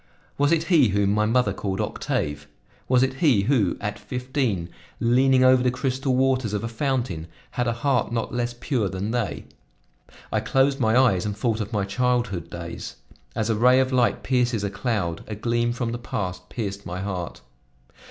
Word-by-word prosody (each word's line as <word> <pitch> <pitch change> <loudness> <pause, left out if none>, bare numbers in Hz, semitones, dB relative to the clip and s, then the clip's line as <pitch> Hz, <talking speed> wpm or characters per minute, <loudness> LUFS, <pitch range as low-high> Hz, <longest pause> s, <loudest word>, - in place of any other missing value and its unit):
Was 145 +2 +2
it 165 -1 +3
he 165 -7 +4
whom 100 0 +1
my 105 +1 +2
mother 115 -3 +2
called 95 -1 -3
Octave? 75 0 -2 0.4
Was 125 0 +4
it 130 0 +1
he 130 - +4
who, 110 -6 +2
at - - -4
fifteen, 125 - -2 0.3
leaning 130 +2 +4
over 130 0 +6
the 125 - +2
crystal 130 +1 -1
waters 130 -4 +1
of 105 0 -2
a - - -1
fountain, 115 - -2 0.2
had 125 0 -1
a - - +2
heart 130 -5 +2
not 115 -2 -2
less 120 0 -2
pure 120 -7 0
than 95 +4 -3
they? 115 -10 -2 0.9
I - - +2
closed 135 +1 +2
my 110 -1 +3
eyes 120 -9 +4
and 105 -1 -3
thought 110 0 0
of 105 +1 -5
my 105 -3 0
childhood 120 -7 -1
days. 85 0 -7 0.4
As 110 0 0
a - - +1
ray 125 +4 +5
of 130 0 +1
light 125 -2 +2
pierces 125 -4 +1
a 100 - -2
cloud, 105 -7 -2
a 105 - -5
gleam 120 +2 0
from 120 -1 -2
the 120 - -4
past 90 -5 -4
pierced 100 -4 -4
my 90 +1 -5
heart. 95 -7 -4
120 Hz, 185 wpm, -24 LUFS, 100-130 Hz, 0.9 s, over